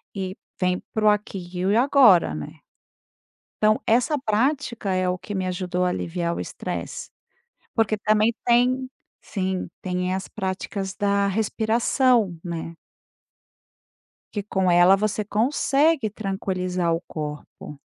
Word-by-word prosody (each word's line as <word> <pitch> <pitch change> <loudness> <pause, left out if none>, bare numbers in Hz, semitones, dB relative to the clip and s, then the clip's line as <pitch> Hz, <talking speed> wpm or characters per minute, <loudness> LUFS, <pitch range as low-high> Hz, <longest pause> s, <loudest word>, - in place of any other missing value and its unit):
e 190 -1 -4 0.2
vem 180 -1 +1
para 215 -1 0
o 210 - +8
aqui 200 -3 -1
e 180 0 -2
o 205 +4 +3
agora, 240 - +5
né. 75 -1 -6 1.1
Então 215 0 +3
essa 245 +6 +3
prática 235 -2 0
é 185 0 +1
o 180 - 0
que 205 - -8
me 185 -1 -1
ajudou 180 0 -1
a - - +2
aliviar 170 -1 -2
o - - -5
estresse. - - -5 0.6
Porque 220 -2 +1
também 215 +2 +2
tem 250 +2 +3 0.3
sim, 190 -2 -3
tem 180 0 -2
as 190 0 -3
práticas 190 0 -4
da 200 -1 +1
respiração, 220 0 +1
né. 170 -1 -5 1.6
Que 205 - -2
com 190 -3 0
ela 175 +2 +6
você 215 +1 -1
consegue 270 +4 +2
tranquilizar 185 -4 -2
o 165 - +1
corpo. 150 -1 -7
195 Hz, 130 wpm, -24 LUFS, 180-220 Hz, 1.6 s, o